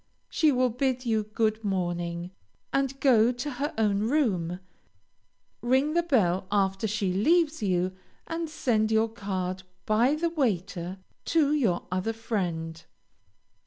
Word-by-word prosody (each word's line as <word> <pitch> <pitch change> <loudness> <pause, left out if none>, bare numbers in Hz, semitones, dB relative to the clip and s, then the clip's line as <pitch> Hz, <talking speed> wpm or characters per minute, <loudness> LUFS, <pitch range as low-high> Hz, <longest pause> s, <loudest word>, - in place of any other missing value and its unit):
She 310 -3 +3
will 255 -2 +2
bid 255 +1 -1
you 220 -2 +2
good 220 0 0
morning, 175 -2 -2 0.4
and 275 0 0
go 240 -4 +5
to 250 +4 -4
her 280 +4 -2
own 210 -3 +2
room; 185 - 0 1.0
ring 260 +6 +2
the 345 - +3
bell 195 - +1
after 195 +1 +1
she 205 -3 -1
leaves 315 - +2
you, 185 -2 0 0.3
and 330 0 -3
send 220 -7 +1
your 220 +1 +3
card 190 -4 -4 0.2
by 235 +7 +3
the 335 +2 -1
waiter 190 - -1 0.3
to 300 -3 +2
your 225 -13 +1
other 185 +5 -1
friend. 170 -8 -3
220 Hz, 130 wpm, -27 LUFS, 185-270 Hz, 1.0 s, go